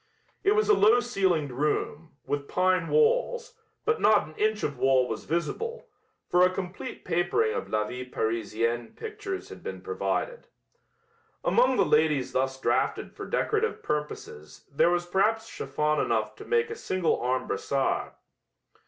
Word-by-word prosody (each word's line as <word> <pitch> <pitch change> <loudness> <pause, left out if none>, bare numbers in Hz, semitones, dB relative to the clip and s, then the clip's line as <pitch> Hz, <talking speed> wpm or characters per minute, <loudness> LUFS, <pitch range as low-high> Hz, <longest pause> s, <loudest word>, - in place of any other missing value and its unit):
It 405 - +4
was 430 - +2
a 425 - +6
low 230 - +5
ceilinged 190 - 0
room, 150 +3 -2
with 140 0 -2
pine 185 -2 +2
walls, 480 +1 +2 0.3
but 450 +1 +1
not 210 -4 +5
an 155 - -13
inch 215 0 0
of 140 -4 -2
wall 130 -1 +4
was 110 - -5
visible, 450 - -3 0.4
for 180 +1 +4
a 180 - +6
complete 185 +6 -6
papering 175 - +1
of - - -4
La 110 0 +1
Vie 125 +3 -6
Parisienne 115 0 -2
pictures 405 -3 -6
had - - -10
been - - -6
provided. - - -3 1.0
Among 255 0 +3
the 195 - +4
ladies 150 -4 +2
thus 130 0 -1
drafted - - 0
for - - -7
decorative 440 +1 0
purposes 150 - -5
there 140 +4 +3
was 175 0 0
perhaps 215 +5 +1
chiffon 150 0 -1
enough - - 0
to - - -10
make 465 -1 +1
a - - -3
single 185 - 0
arm 130 +1 0
brassard. 135 -1 -1
175 Hz, 155 wpm, -27 LUFS, -, 1.0 s, a